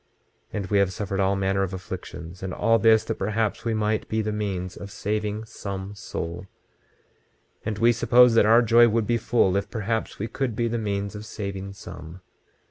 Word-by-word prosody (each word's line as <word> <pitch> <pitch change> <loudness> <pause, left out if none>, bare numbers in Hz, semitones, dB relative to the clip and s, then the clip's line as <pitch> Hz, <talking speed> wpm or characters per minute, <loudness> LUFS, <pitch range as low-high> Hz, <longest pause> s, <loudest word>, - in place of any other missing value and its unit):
26:30 - - -43 0.5
And 100 -2 -2
we 100 - +4
have 100 -1 +2
suffered 100 0 -3
all 95 0 +2
manner 95 0 0
of 95 -1 -2
afflictions, 90 -2 -8
and 95 -1 -4
all 115 +1 +3
this, 110 0 +5
that 110 0 -4
perhaps 110 +2 -1
we 115 -1 0
might 110 0 -1
be 110 0 0
the 105 - -2
means 95 -4 -3
of 100 - -8
saving 105 +1 -3
some 100 -2 -6
soul; 85 -2 -6 1.2
and 110 -2 -3
we 115 +2 +5
supposed 120 +1 +5
that 115 - +6
our 115 +2 +6
joy 120 +1 +6
would 110 0 +1
be 120 +2 +1
full 110 -5 +2
if 100 0 -1
perhaps 110 0 -2
we 110 - -3
could 125 -2 -2
be 115 +1 0
the 115 0 -1
means 100 -1 -2
of 105 0 -7
saving 100 -3 -6
some. 90 -2 -10
105 Hz, 200 wpm, -25 LUFS, 95-115 Hz, 1.2 s, that